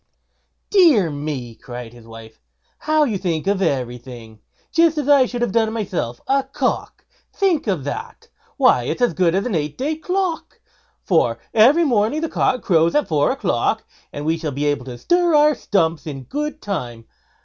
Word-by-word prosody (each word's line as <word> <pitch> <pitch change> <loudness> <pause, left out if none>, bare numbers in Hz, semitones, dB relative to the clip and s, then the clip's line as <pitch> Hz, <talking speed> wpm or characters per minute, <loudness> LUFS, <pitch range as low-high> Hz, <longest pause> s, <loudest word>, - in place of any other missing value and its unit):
"Dear 300 - +5
me!" 145 -5 -5
cried 120 0 -9
his 120 -2 -16
wife, 115 -1 -13 0.4
"how 310 0 +2
you 220 -9 -1
think 170 -4 -2
of 195 0 0
everything! 125 - -4 0.3
just 330 -1 +3
as 290 -2 -2
I 280 -3 +5
should 240 0 -3
have 240 - -1
done 220 0 +1
myself. 175 - -3
A 275 +1 +3
cock! 270 0 -3 0.3
think 370 - 0
of 185 -9 -1
that! 145 - -6 0.3
why 120 - +4
it's 250 - -2
as 245 - +2
good 175 0 +2
as 195 - 0
an 245 - -2
eight 150 -3 -2
day 295 +5 -1
clock, 360 +1 -3 0.4
for - - +2 0.2
every 265 +10 +5
morning 240 +3 +1
the 325 - -2
cock 255 - 0
crows 165 -2 +2
at 295 - +2
four 150 -3 +2
o'clock, - - 0 0.3
and 145 - -6
we 160 +1 0
shall 160 -2 -3
be 145 +2 -3
able 145 -3 -1
to 125 -2 -8
stir 345 - +2
our 300 0 +5
stumps 165 - -1
in 135 -3 -6
good 300 - -5
time. 120 - -5
190 Hz, 180 wpm, -20 LUFS, -, 0.4 s, Dear